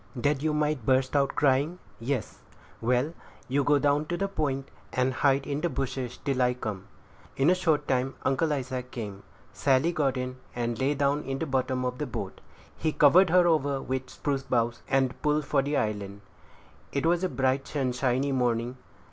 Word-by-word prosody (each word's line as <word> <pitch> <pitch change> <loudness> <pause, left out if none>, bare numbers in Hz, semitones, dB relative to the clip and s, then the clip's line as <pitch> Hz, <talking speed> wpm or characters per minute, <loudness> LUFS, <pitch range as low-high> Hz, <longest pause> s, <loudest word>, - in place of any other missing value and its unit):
"That 140 +2 0
you 155 0 +1
might 150 -3 0
burst 130 +3 +2
out 140 -1 +2
crying?" 145 +5 +2 0.2
"Yes." 120 -1 -3 0.4
"Well, 125 +6 +1 0.3
you 140 +2 +1
go 145 +1 +4
down 145 +1 +2
to 175 - -2
the 195 - 0
point, 140 -8 -2 0.2
and 130 +1 +1
hide 135 +1 +2
in 145 +1 -2
the 175 - +1
bushes 130 -4 -3
till 135 -2 -1
I 125 0 +3
come." 105 -6 -5 0.5
In 140 +6 +4
a - - +6
short 170 -5 +1
time 130 0 0
Uncle 150 +4 +1
Isaac 130 -3 -3
came. 105 -6 -6 0.3
Sally 140 +4 +2
got 140 -6 0
in, 125 0 -4 0.2
and 120 -1 -2
lay 140 +2 +1
down 140 +1 +1
in 135 -1 -3
the 165 - -2
bottom 130 -2 0
of 125 0 -3
the 150 - -2
boat; 120 - -6 0.3
he 155 - -1
covered 165 +6 +6
her 180 +1 +5
over 145 -5 +2
with 130 -1 -3
spruce 140 -2 -2
boughs, 120 -3 0
and 135 -1 +1
pulled 150 0 +1
for 140 -1 +2
the 145 +1 -1
island. 105 -3 -2 0.7
It 140 +2 -1
was 175 +2 +2
a 185 - +1
bright, 135 +1 0
sunshiny 130 0 0
morning. 125 -1 0
135 Hz, 185 wpm, -28 LUFS, 125-150 Hz, 0.7 s, a